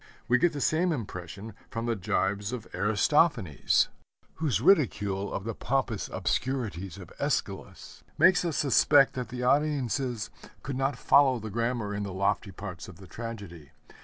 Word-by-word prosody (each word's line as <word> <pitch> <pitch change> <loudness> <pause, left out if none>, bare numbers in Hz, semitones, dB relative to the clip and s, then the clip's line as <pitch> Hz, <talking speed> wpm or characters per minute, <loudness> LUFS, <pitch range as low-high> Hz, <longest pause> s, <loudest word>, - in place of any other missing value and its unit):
We 125 +1 +4
get 175 +4 +3
the 145 - -4
same 170 +5 +2
impression 100 - -6 0.2
from 115 +2 -4
the 120 -1 0
jibes 100 +2 -1
of 125 -4 -5
Aristophanes, 105 - +2 0.5
whose 150 -9 0
ridicule 105 - +2
of 95 - -3
the 115 +1 -3
pompous 125 -3 -2
obscurity 100 +2 -2
of 90 - -11
Æschylus - - -3 0.2
makes 185 -1 +5
us 170 -4 -2
suspect 140 0 +4
that 125 -1 -5
the 125 0 -5
audiences 130 -4 0 0.3
could 135 0 -4
not 135 0 0
follow 135 -2 +4
the 110 -2 -7
grammar 115 -1 -1
in 100 - -3
the 100 -2 -4
lofty 100 +2 0
parts 90 -4 -8
of - - -11
the 95 +3 -13
tragedy. 95 - -8
115 Hz, 155 wpm, -28 LUFS, 100-135 Hz, 0.5 s, makes